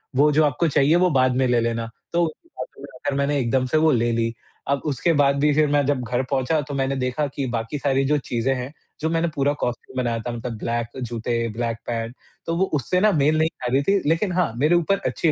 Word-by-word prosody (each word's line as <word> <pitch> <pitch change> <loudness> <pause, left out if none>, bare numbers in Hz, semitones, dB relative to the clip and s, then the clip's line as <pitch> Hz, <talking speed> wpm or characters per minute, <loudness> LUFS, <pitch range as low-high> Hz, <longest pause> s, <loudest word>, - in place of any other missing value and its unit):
वो 150 +3 +5
जो 155 +1 +4
आपको 150 +4 +1
चाहिए 150 +1 +3
वो - - +3
बाद 130 -1 +2
में 130 - +2
ले 120 -1 +3
लेना।" 115 0 -2 0.2
तो 170 - +3
उनकी 170 - -5
बातों - - -7
में - - -8
आकर 145 -1 -2
मैंने 140 +1 +1
एकदम 130 +1 +1
से 140 +5 +1
वो 155 0 +4
ले 120 -2 +2
ली, 115 0 0 0.3
अब 140 0 0
उसके 150 +3 +1
बाद 140 -2 +3
भी 150 +1 +3
फिर 155 +1 +3
मैं 145 -1 +3
जब 140 -2 0
घर 125 +1 -1
पहुँचा 140 +3 +1
तो 145 - -5
मैंने 135 0 0
देखा 125 +3 -1
कि 140 - -2
बाकी 115 +5 -3
सारी 135 0 +1
जो 150 +2 +2
चीज़ें 125 -1 -1
हैं, 125 +2 -5 0.3
जो 160 - -1
मैंने 165 +1 +1
पूरा 140 +1 +2
कॉस्ट्यूम 125 +1 -4
बनाया 120 -2 0
था, 120 +2 -4
मतलब 115 -1 -5
ब्लैक 115 +1 -2
जूते, 115 0 -2
ब्लैक 115 -1 -1
पैंट, 115 +1 -3 0.3
तो 165 - -1
वो 190 - +3
उससे 155 +5 +1
ना 210 +1 +4
मेल 155 -1 +2
नहीं 160 +1 +2
खा 125 -6 -5
रही 135 - +4
थी, 200 +7 +3
लेकिन 180 +4 +1
हाँ, 175 -7 +1
मेरे 150 +7 +3
ऊपर 175 +3 +2
अच्छी 160 - +1
140 Hz, 245 wpm, -23 LUFS, 120-155 Hz, 0.3 s, वो